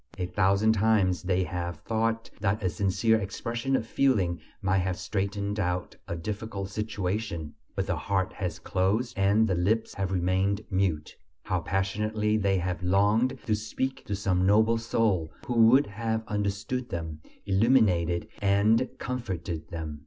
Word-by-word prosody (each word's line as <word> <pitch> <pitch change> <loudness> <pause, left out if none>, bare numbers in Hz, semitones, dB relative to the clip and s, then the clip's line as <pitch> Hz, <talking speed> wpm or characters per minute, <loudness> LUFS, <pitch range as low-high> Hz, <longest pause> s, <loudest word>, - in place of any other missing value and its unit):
A 90 - -1
thousand 100 +4 +3
times 105 -4 +2
they 95 0 +1
have 85 -1 -4
thought 115 +3 -1
that 105 +1 0
a 90 - +1
sincere 105 +5 +2
expression 115 +6 -2
of 115 - 0
feeling 105 -9 +1 0.2
might 95 -2 +1
have 90 -1 -1
straightened 100 +2 -2
out 90 -2 -2
a 85 - -3
difficult 100 +2 -4
situation; 100 -6 -3 0.2
but - - -1
the - - -1
heart 95 -2 -1
has 90 -4 -3
closed 105 +6 0
and 100 +3 +3
the 95 - +1
lips 105 +6 +1
have 95 -1 -2
remained 95 +2 +1
mute. 95 -5 0 0.3
How 95 -3 0
passionately 105 +4 0
they 100 -2 +2
have 90 0 -2
longed 105 +8 +2
to 110 - +1
speak 110 +5 -3
to 105 - -1
some 95 -2 +1
noble 110 +4 +4
soul 110 -8 0
who 115 -2 +5
would 135 +4 +6
have 110 +1 -2
understood 105 +5 -2
them, 80 -3 -5 0.2
illuminated 95 -5 +3
and 105 +5 +3
comforted 90 -10 -4
them! 80 -3 -5
100 Hz, 150 wpm, -28 LUFS, 90-110 Hz, 0.3 s, would